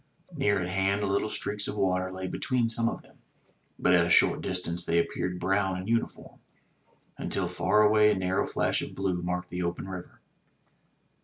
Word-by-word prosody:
Near 100 Hz, -1 st, +2 dB
at 90 Hz, -, -2 dB
hand 95 Hz, +2 st, 0 dB
little 100 Hz, +2 st, 0 dB
streaks 105 Hz, -1 st, -3 dB
of 105 Hz, -, -4 dB
water 95 Hz, -1 st, 0 dB
lay 95 Hz, 0 st, -5 dB
between 120 Hz, +5 st, 0 dB
some 115 Hz, 0 st, +1 dB
of -, -, -7 dB
them, -, -, -22 dB, 0.6 s
but 90 Hz, -, +3 dB
at 85 Hz, -1 st, +4 dB
a -, -, -3 dB
short -, -, +4 dB
distance 90 Hz, -1 st, -1 dB
they 85 Hz, -1 st, +1 dB
appeared 90 Hz, +1 st, -1 dB
brown 95 Hz, +1 st, 0 dB
and 95 Hz, +1 st, -6 dB
uniform, 115 Hz, 0 st, -2 dB, 0.8 s
until -, -, -1 dB
far 105 Hz, -, +2 dB
away 105 Hz, 0 st, +5 dB
a -, -, +1 dB
narrow 95 Hz, 0 st, 0 dB
flash -, -, 0 dB
of -, -, -7 dB
blue 95 Hz, -2 st, -1 dB
marked 90 Hz, 0 st, -3 dB
the 90 Hz, +1 st, -3 dB
open 85 Hz, +2 st, -3 dB
river. 90 Hz, -2 st, -8 dB
95 Hz, 180 wpm, -28 LUFS, 90-105 Hz, 0.8 s, away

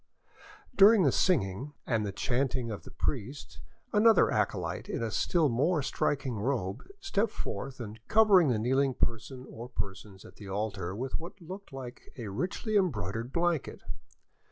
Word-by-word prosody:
During 205 Hz, -2 st, +7 dB
the 140 Hz, -, +4 dB
singing, 135 Hz, -, +1 dB
and 115 Hz, -3 st, +1 dB
the 100 Hz, -, -2 dB
chanting 125 Hz, +2 st, -1 dB
of 105 Hz, -, -5 dB
the -, -, -9 dB
priest, 135 Hz, +8 st, -4 dB, 0.3 s
another 220 Hz, 0 st, +6 dB
acolyte -, -, -1 dB
in -, -, -2 dB
a 115 Hz, -, -2 dB
still 165 Hz, -, +2 dB
more 145 Hz, +6 st, +1 dB
striking 130 Hz, -4 st, -1 dB
robe 110 Hz, -3 st, -1 dB, 0.2 s
stepped 230 Hz, -, 0 dB
forth 130 Hz, -, -5 dB
and 110 Hz, -2 st, -7 dB
covered 200 Hz, -8 st, +6 dB
the 120 Hz, -, +2 dB
kneeling 130 Hz, +4 st, +1 dB
person 120 Hz, +3 st, -2 dB
or 120 Hz, +2 st, -9 dB
persons 100 Hz, -3 st, -6 dB
at -, -, -14 dB
the 100 Hz, -2 st, -9 dB
altar 95 Hz, -2 st, -3 dB
with 130 Hz, +7 st, -3 dB
what 170 Hz, +5 st, -9 dB
looked 190 Hz, +2 st, -9 dB
like 130 Hz, -2 st, -9 dB
a 115 Hz, -5 st, -5 dB
richly 185 Hz, -, -2 dB
embroidered 115 Hz, -, -1 dB
blanket. 170 Hz, -2 st, -1 dB
130 Hz, 155 wpm, -30 LUFS, 110-170 Hz, 0.3 s, During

